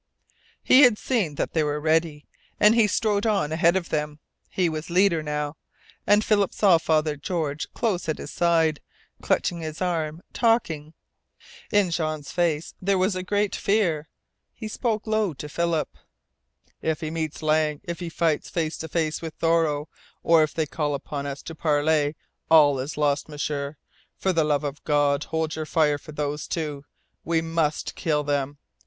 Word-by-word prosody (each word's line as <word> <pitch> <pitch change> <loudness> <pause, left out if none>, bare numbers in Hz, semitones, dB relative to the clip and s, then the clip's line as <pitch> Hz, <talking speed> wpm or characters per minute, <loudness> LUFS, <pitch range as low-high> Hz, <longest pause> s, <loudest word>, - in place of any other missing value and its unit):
He 260 - +7
had 245 -6 +6
seen 210 - -1
that - - -2
they 160 - +2
were 150 0 -1
ready, 155 -1 0 0.3
and 210 +1 +6
he 230 -2 +4
strode 210 +1 +1
on 195 -8 +1
ahead 170 +2 +3
of 185 -3 -1
them. 150 -1 -2 0.3
He 180 -2 +1
was 155 0 -4
leader 180 -2 +3
now, 150 0 -3 0.5
and 210 +1 +4
Philip 205 -3 +2
saw 190 -6 +5
Father 155 -1 +1
George 150 -1 -3
close 190 -9 -1
at 155 - -1
his - - -7
side, 165 -3 +2 0.4
clutching 175 - 0
his 155 -1 -6
arm, 165 -3 -2
talking. 165 -10 0 0.8
In 205 -4 +3
Jean's 155 -3 -2
face 165 -3 0
there 195 +1 +2
was 185 +1 +1
a 185 - -2
great 205 +2 0
fear. 175 -8 0 0.5
He 220 - -6
spoke 220 0 -2
low 215 -6 0
to 145 +3 -7
Philip. 170 +1 -1 0.9
"If 160 +1 -1
he 155 -1 -3
meets 160 -1 -4
Lang, 155 -1 +2
if 170 -3 -5
he 175 -2 -4
fights 165 -2 0
face 160 -2 -2
to 160 - -5
face 160 -1 -1
with 160 -2 -6
Thoreau, 160 -3 +1 0.4
or 165 -1 +5
if 155 -1 +1
they 160 - -1
call 150 -1 -2
upon 140 0 -5
us 140 0 -6
to 165 - -7
parley, 150 -1 +1 0.3
all 145 -4 +6
is 135 +4 -5
lost! 145 0 0
M'sieur, 145 -1 -3 0.4
for 190 - 0
the 165 -2 +3
love 150 -1 +1
of 145 0 -5
God, 145 -1 +2
hold 160 -1 -2
your 155 -1 -4
fire 150 -3 +2
for 155 - -12
those 150 0 -3
two! 150 -4 -4 0.4
We 165 0 +1
must 165 -2 -1
kill 150 -2 0
them. 145 0 -1
160 Hz, 175 wpm, -25 LUFS, 150-175 Hz, 0.9 s, He